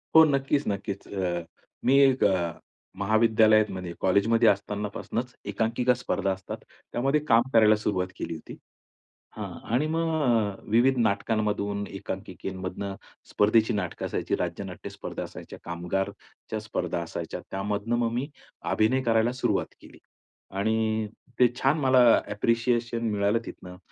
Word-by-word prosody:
हो, 160 - +10
नक्कीच, 140 0 +1
नक्कीच. 100 0 -3
अ, 90 -3 -2 0.4
मी 135 +2 +5
एक 135 -2 +4
अ, 90 -4 +2 0.5
महाविद्यालयातमध्ये 110 -3 +3
कॉलेजमध्ये 110 +5 +3
असतानापासनंच 105 +4 -2 0.2
एकांकिका 120 +3 +1
स्पर्धा 100 -5 -1
असतात. 95 0 -5 0.3
त्यामध्ये 135 +5 +1
काम 115 -1 +6
करायला 110 -2 +6
सुरुवात 100 -4 -1
केली - - -4
होती. 80 - -10 0.8
हां - - -4 0.3
आणि 140 +5 +2
मग 165 0 +1
अ, 110 -6 +2 0.2
विविध 125 +4 +4
नाटकांमधून, 105 -2 0
एकांकिकेमधनं, 95 0 -5 0.4
स्पर्धेची 110 +2 +3
नाटकं 95 -4 -3
असायची, - - -2
राज्यनाट्य - - -5
स्पर्धा - - -6
असायच्या, - - -9
कामगारच्या 90 +5 -4
स्पर्धा 90 -5 -3
असायच्या. 85 - -5
त्यामधनं 105 +4 -1
मग 115 -1 0
मी 125 +4 -2 0.4
अभिनय 120 +5 +2
करायला 115 -1 +2
सुरुवात - - 0
केली. - - -15 0.5
आणि 110 +2 0 0.3
ते 125 - +7
छान 135 +5 +2
मला 130 -3 +4 0.3
ॲप्रिशिएशन 115 +1 0
मिळालं 105 +2 +2
तिथनं. 90 0 -9
110 Hz, 125 wpm, -27 LUFS, 100-120 Hz, 0.8 s, हो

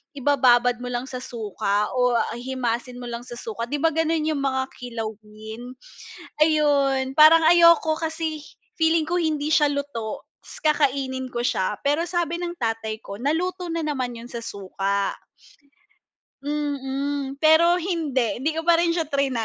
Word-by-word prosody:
ibababad 245 -3 +3
mo 250 - -6
lang 245 0 -3
sa 255 - -5
suka 210 -4 -2
o 250 -1 +2 0.2
himasin 245 -1 -3
mo 245 - -6
lang 235 +1 -6
sa 240 - -8
suka, 230 -1 -5
'di 290 +2 -3
ba, 325 - +4
gano'n 320 0 0
'yong 300 -3 -1
mga 265 -1 0
kilawin? 220 0 -7 0.7
Ayun 280 -3 +2
parang 315 +2 +8
ayoko 335 -2 +5
kasi, 320 -1 -3 0.4
feeling 320 0 +3
ko 350 +1 0
hindi 305 -2 -1
siya 295 -2 +5
luto, 280 -7 -4 0.2
tas - - -13
kakainin 275 -3 +1
ko 240 0 -2
siya, 190 -3 0
pero 300 +5 +1
sabi 345 -1 -1
ng 350 0 -4
tatay 225 -3 -3
ko 200 +2 -8
naluto 355 +6 -1
na 330 0 -2
naman 255 -5 -2
'yon 235 +1 -10
sa 235 - -5
suka. 200 -2 -2 1.3
Mm, 280 -1 -3
pero 325 +3 +5
hindi 290 - -1
hindi 300 +5 0
ko 320 - -1
pa 340 - +6
rin 335 0 +2
siya 330 -3 -1
triny. 280 -2 0
275 Hz, 155 wpm, -23 LUFS, 240-315 Hz, 1.3 s, parang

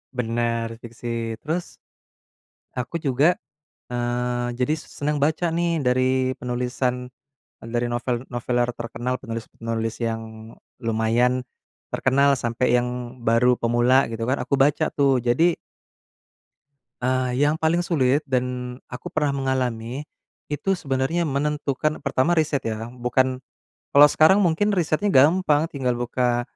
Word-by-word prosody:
benar, 115 -1 -1
fiksi. 115 -1 -5
Terus, 165 +3 -3 1.0
aku 125 +6 -4
juga, 145 +5 +3 0.6
eee, 120 0 -1
jadi 125 +5 +2
senang 150 0 -3
baca 160 +3 +1
nih, 170 -1 0
dari 130 +1 +2
penulisan, 125 0 -2 0.5
eee, 115 - -10
dari 120 0 0
novel-noveler 120 0 -1
terkenal, 120 +2 -3
penulis-penulis 115 -1 -4
yang 115 -1 -1 0.6
lumayan 115 +2 +1 0.5
terkenal, 140 +2 +3
sampai 120 0 0
yang 125 0 -3
baru 120 +2 +4
pemula, 120 +3 +3
gitu 115 0 -3
kan. 130 - +2
Aku 130 +3 -1
baca 145 +3 +3
tuh. 135 -3 +3
Jadi 160 +9 +3 1.5
eee, 130 0 0
yang 150 +2 +3
paling 160 +2 +2
sulit, 145 -5 +2
dan 125 -1 -2
aku 125 - -8
pernah 150 -2 0
mengalami. 130 -1 -2 0.4
Itu 185 +6 -1
sebenarnya 140 +3 -1
menentukan 150 +1 -1
pertama 140 +5 +1
riset 150 -3 +1
ya, 115 +2 -4
bukan 125 +1 0 0.5
kalau 145 +1 +9
sekarang 160 +6 +5
mungkin 195 +4 +2
risetnya 170 +1 0
gampang. 155 +2 +4
Tinggal 130 -4 -1
buka 120 0 0
125 Hz, 115 wpm, -23 LUFS, 120-145 Hz, 1.5 s, kalau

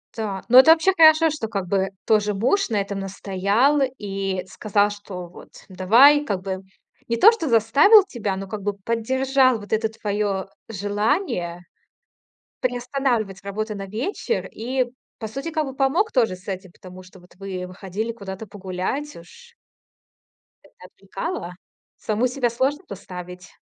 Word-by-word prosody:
Так, 205 -4 -4
ну 250 +2 +8
это 265 +5 +8
вообще 325 +4 +4
хорошо, 320 -1 +6
что 290 -7 -4
как 200 -4 -4
бы 190 +1 0 0.2
тоже 210 -1 +2
муж 260 - +1
на 215 -3 0
этом 200 0 -3
настоял 200 +8 +1 0.2
и 195 -2 -3
сказал, 205 +2 0
что: 205 -3 -8
"Вот 175 - -14 0.2
давай", 235 +11 +5
как 200 -9 -3
бы 190 -1 -3 0.5
не 235 - -1
то 430 - +8
что 390 -10 -3
заставил 275 - +6
тебя, 220 - -4
но 195 +1 -6
как 210 +1 -6
бы 205 +1 -1
поддержал 255 +5 +1
вот 205 0 -7
это 220 0 +1
твоё 205 -3 -2 0.2
желание 205 - -1 1.0
приостанавливать 245 -5 -1
работу 215 +2 -4
на 195 -1 -6
вечер 250 - -3
и, 255 +3 -2 0.3
по 220 - -4
сути, 275 +9 -6
кову 305 -4 -2
помог 290 +11 +1
тоже 225 -8 +2
с 185 - -21
этим, 190 -2 -6
потому 185 0 -13
что 185 +1 -16
вот 180 0 -21
вы 185 -1 -6
выходили 195 +5 -5
куда-то 200 -1 -8
погулять, 200 +9 -4
уж. 470 - -16 1.1
Это - - -22
отвлекалово? 330 - -6 0.4
Саму 220 +4 0
себя 250 -1 -1
сложно 265 +8 -1
поставить. 180 -2 -9
215 Hz, 150 wpm, -22 LUFS, 195-265 Hz, 1.1 s, ну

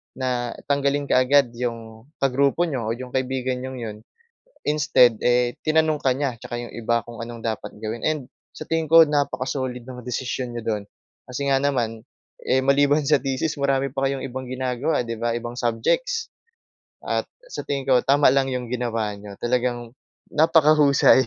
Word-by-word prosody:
na 125 -2 -2 0.2
tanggalin 140 0 +1
kaagad, 130 0 +4
'yong 115 -1 -5 0.2
kagrupo 140 +5 +2
niyo 130 -7 -3
o 115 - 0
'yong 125 +1 -7
kaibigan 130 -1 -1
niyong 130 -1 -6
'yon. 110 -2 -5 0.7
Instead, 140 -6 +4
eh, 125 0 +2
tinanong 155 -1 +2
ka 130 - +3
niya, 135 -2 -2
tsaka 120 0 -6
'yong 120 - -8
iba 115 0 +1
kung 115 0 -7
anong 120 0 -8
dapat 110 -2 -3
gawin, 110 +1 -5
and 155 -5 -1 0.2
sa - - -9
tingin 160 -1 -1
ko 165 -1 +9
napaka-solid 130 -3 -1
ng 125 -2 -8
desisyon 125 0 -3
niyo 120 -1 -6
do'n. 105 - -6 0.4
Kasi 135 +3 -3
nga 135 -1 +3
naman, 115 -6 -1 0.4
eh, 130 - +2
maliban 140 +2 +3
sa 150 - +5
thesis 135 +4 -1
marami 135 -1 +1
pa 135 0 +1
kayong 135 -1 -4
ibang 130 +1 -6
ginagawa, 130 +2 -1
'di 115 - -3
ba, 115 0 0
ibang 120 0 -5
subjects. 455 - 0 0.8
At - - 0 0.3
sa - - -4
tingin 140 -1 -1
ko, 125 -1 +6
tama 140 +1 +5
lang 135 -1 +2
'yong 125 -2 -3
ginawa 115 -3 -1
niyo, 100 0 -10
talagang 120 -1 -1 0.4
napakahusay, 150 -4 +5
130 Hz, 165 wpm, -23 LUFS, 120-140 Hz, 0.8 s, ko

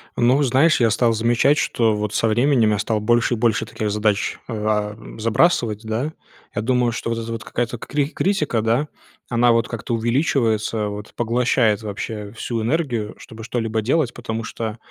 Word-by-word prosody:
Ну, 125 +4 +3
знаешь, 140 +6 +4
я 115 -2 +4
стал 115 +2 +2
замечать, 120 +6 +3
что 115 -7 +1
вот 105 0 -3
со 115 - +2
временем 120 0 +3
я 105 - 0
стал 110 +1 0
больше 120 +3 +2
и 120 - -1
больше 115 -1 +1
таких 110 -1 -3
задач, 105 -1 0
э, 120 - -5
а, 105 -1 -1 0.2
забрасывать, 115 -2 +2
да. 115 +8 -2 0.4
Я - - 0
думаю, 125 +1 +1
что 115 - -4
вот 115 0 -1
эта 115 0 -5
вот 115 - -5
какая-то 120 0 -3
кри 140 +4 -1
критика, 155 - 0
да, 115 +7 +1 0.4
она 120 0 +4
вот 115 0 +2
как-то 115 0 -4
увеличивается 115 -3 +1
вот, 105 0 -7
поглощает 120 -2 +2
вообще 105 0 -5
всю 115 0 -4
энергию, 120 -4 -1
чтобы 110 0 -11
что-либо 115 -2 -2
делать. 130 +2 +1
Потому 115 -2 -4
что 115 -1 -5
115 Hz, 175 wpm, -21 LUFS, 110-125 Hz, 0.4 s, знаешь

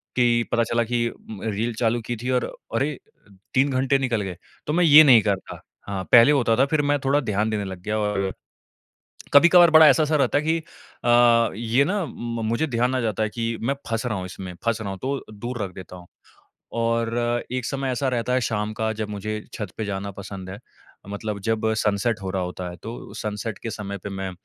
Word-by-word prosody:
कि 120 -2 +3
पता 115 - +2
चला 115 +1 0
कि 120 0 0
उम, 110 -3 -11
रील 110 +2 -2
चालू 120 0 +1
की 120 - -3
थी 125 - -3
और 125 - +1 0.3
अरे! 140 +6 +1 0.4
अ, 105 - -21 0.2
3 135 +2 +3
घंटे 135 +1 +2
निकल 120 -5 0
गए, 95 -3 -5 0.3
तो 150 - 0
मैं 180 - +3
ये 155 -1 +9
नहीं 125 -6 +7
करता। 100 -2 -3 0.3
हाँ, 95 -2 -3
पहले 120 +4 +8
होता 120 -5 +3
था 135 - +4
फिर 150 +1 +1
मैं 145 0 +1
थोड़ा 140 +2 +3
ध्यान 110 -4 -1
देने 105 -2 -2
लग 95 -2 -7
गया, 105 +2 -1
और 100 -2 -1 1.0
कभी-कभार 175 +3 +7
बड़ा 160 0 +8
ऐसा-सा 155 0 +3
रहता 145 - +2
है 145 - -3
कि 160 +1 +1 0.5
अ, 120 -1 +5
ये 120 +4 +2
ना 200 +5 -1
उम, 120 -7 -5
म - - -3
मुझे 115 +8 0
ध्यान 125 -1 0
आ - - 0
जाता 110 -2 -1
है 110 - +1
कि 115 0 -3
मैं 135 +4 0
फँस 115 +2 -2
रहा 110 -4 -1
हूँ 90 - -5
इसमें, 90 -1 -8
फँस 115 -1 +1
रहा 100 - -4
हूँ, 95 - -6
तो 135 +1 -3
दूर 120 +2 -5
रख 95 -2 -4
देता 90 -1 -10
हूँ। 90 -1 -13 0.7
और 115 +1 0
एक 130 -2 -2
समय 135 -1 -2
ऐसा 135 +2 -1
रहता 125 -1 -1
है 130 - +2
शाम 110 -3 -2
का, 110 -1 -2
जब 110 -1 -4
मुझे 105 +1 -4
छत 105 - -5
पे 110 - -2
जाना 100 0 -4
पसंद 95 -1 -8
है, 100 - -8 0.5
मतलब 105 +1 -4
जब 110 +2 0
सनसेट 105 +1 0
हो 95 - -3
रहा 95 0 -2
होता 90 0 -5
है 90 - -9
तो 115 +2 -8
सनसेट 105 0 -4
के 115 - -6
समय 100 -2 -6
पे 95 - -7
मैं 95 -1 -4
115 Hz, 225 wpm, -23 LUFS, 105-130 Hz, 1.0 s, ये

